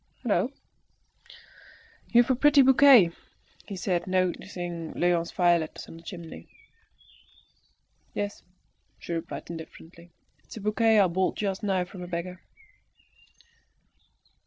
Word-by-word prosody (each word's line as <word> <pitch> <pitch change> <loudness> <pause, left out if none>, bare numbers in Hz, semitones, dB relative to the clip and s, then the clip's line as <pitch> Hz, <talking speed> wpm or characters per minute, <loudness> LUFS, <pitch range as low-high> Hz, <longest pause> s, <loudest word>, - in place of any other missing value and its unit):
"Hallo! - - +1 1.6
you've 240 +2 +4
a - - +3
pretty 290 +2 +5
bouquet," 260 -8 +7 0.6
he 200 - -6
said, 180 -2 -2
noticing 175 -2 -3
Léon's 175 -1 +1
violets 175 -3 0
on 165 - -11
the - - -13
chimney. 165 - -10 1.7
"Yes," 205 0 -4 0.6
she 170 - -7
replied 165 0 -5
indifferently; 170 +1 -11 0.3
"it's - - -12
a - - -6
bouquet 215 +1 +2
I 200 - +6
bought 185 +1 0
just 195 -1 -3
now 190 -4 0
from 180 +1 -11
a 180 - -7
beggar." 180 +1 -5
180 Hz, 110 wpm, -27 LUFS, 170-205 Hz, 1.7 s, bouquet